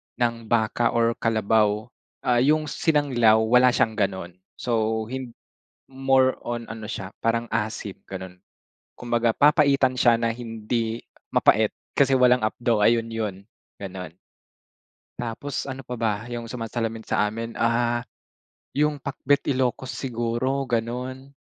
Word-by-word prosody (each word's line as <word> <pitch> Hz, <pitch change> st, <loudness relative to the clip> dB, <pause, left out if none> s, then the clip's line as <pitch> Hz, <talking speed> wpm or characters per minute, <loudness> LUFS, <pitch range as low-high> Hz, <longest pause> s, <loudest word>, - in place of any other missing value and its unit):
ng 115 Hz, -2 st, -1 dB
baka 115 Hz, +1 st, +1 dB
or 115 Hz, 0 st, +3 dB
kalabaw. 110 Hz, -1 st, +2 dB, 0.4 s
Ah, 120 Hz, -1 st, +3 dB
'yong 155 Hz, +4 st, +3 dB
sinanglaw, 130 Hz, -8 st, +3 dB
wala 125 Hz, +2 st, +5 dB
siyang 110 Hz, -1 st, +1 dB
gano'n. 95 Hz, -2 st, -2 dB, 0.2 s
So, 110 Hz, -2 st, 0 dB
hin 130 Hz, -3 st, -6 dB, 0.5 s
more 135 Hz, -1 st, +2 dB
on 120 Hz, -1 st, -4 dB
ano 110 Hz, -1 st, -7 dB
siya, 95 Hz, -4 st, -5 dB
parang 115 Hz, 0 st, -1 dB
asim, 110 Hz, -3 st, -3 dB
gano'n. 95 Hz, -1 st, -8 dB, 0.6 s
Kumbaga, 120 Hz, -1 st, +1 dB
papaitan 140 Hz, -2 st, +4 dB
siya 120 Hz, -2 st, +4 dB
na 115 Hz, -1 st, 0 dB
hindi 115 Hz, 0 st, -3 dB, 0.3 s
mapait -, -, +4 dB, 0.2 s
kasi 135 Hz, -1 st, +4 dB
walang 125 Hz, -2 st, +4 dB
apdo. 110 Hz, -1 st, +1 dB
Ayun 115 Hz, 0 st, +3 dB
'yon, 110 Hz, -4 st, -3 dB, 0.4 s
gano'n. 95 Hz, -4 st, -7 dB, 1.1 s
Tapos 120 Hz, +5 st, -4 dB
ano 135 Hz, 0 st, -6 dB
pa 125 Hz, -1 st, -6 dB
ba, 110 Hz, -2 st, +1 dB, 0.2 s
yung 120 Hz, -1 st, -5 dB
sumasalamin 115 Hz, -1 st, -4 dB
sa 105 Hz, -, +1 dB
amin, 115 Hz, +2 st, -5 dB
ah, 120 Hz, +1 st, +1 dB, 0.6 s
yung 150 Hz, -1 st, 0 dB
pakbet 140 Hz, +1 st, 0 dB
Ilocos 130 Hz, 0 st, -1 dB
siguro, 125 Hz, +2 st, -1 dB
ganun. 125 Hz, +4 st, -3 dB
115 Hz, 125 wpm, -24 LUFS, 110-130 Hz, 1.1 s, wala